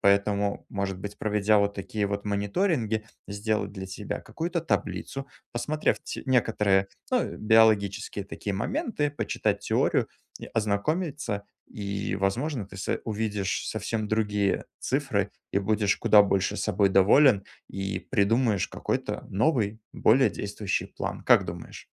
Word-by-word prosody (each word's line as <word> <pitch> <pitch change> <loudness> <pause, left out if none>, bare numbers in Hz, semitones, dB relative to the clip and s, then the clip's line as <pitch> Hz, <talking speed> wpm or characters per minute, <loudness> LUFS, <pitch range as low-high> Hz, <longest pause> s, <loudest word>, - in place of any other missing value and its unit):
Поэтому, 100 0 +2
может 100 -2 -2
быть, 105 +1 -7
проведя 105 0 +3
вот 100 0 +1
такие 105 +1 -2
вот 100 +1 -3
мониторинги, 110 - 0 0.2
сделать 105 -1 -2
для 95 -2 -6
тебя 95 +2 -5
какую-то 170 +1 -3
таблицу, 135 -3 -2 0.3
посмотрев 150 +6 0
те - - -5
некоторые, 105 -6 +3 0.2
ну, - - 0
биологические 105 -3 +3
такие 100 0 -5
моменты. 150 - -1
Почитать 145 - -1
теорию - - +1 0.3
и - - -8
ознакомиться. 115 - -1 0.2
И, 100 -2 -3
возможно, 115 +6 -1
ты 100 0 -12
со 95 - -2
увидишь 105 -3 -2
совсем 110 0 -2
другие 105 -2 +1
цифры, - - 0 0.2
и 100 - +3
будешь 105 0 +1
куда 105 -1 +6
больше 100 -1 0
собой 100 -1 +2
доволен, 100 +3 +6 0.3
и 95 +1 -3
придумаешь 115 -2 +1
какой-то - - -3
новый, 110 -1 +1
более 130 +4 +4
действующий 100 -1 -2
план. - - -5
Как - - +6
думаешь? - - -8
105 Hz, 130 wpm, -27 LUFS, 100-115 Hz, 0.3 s, куда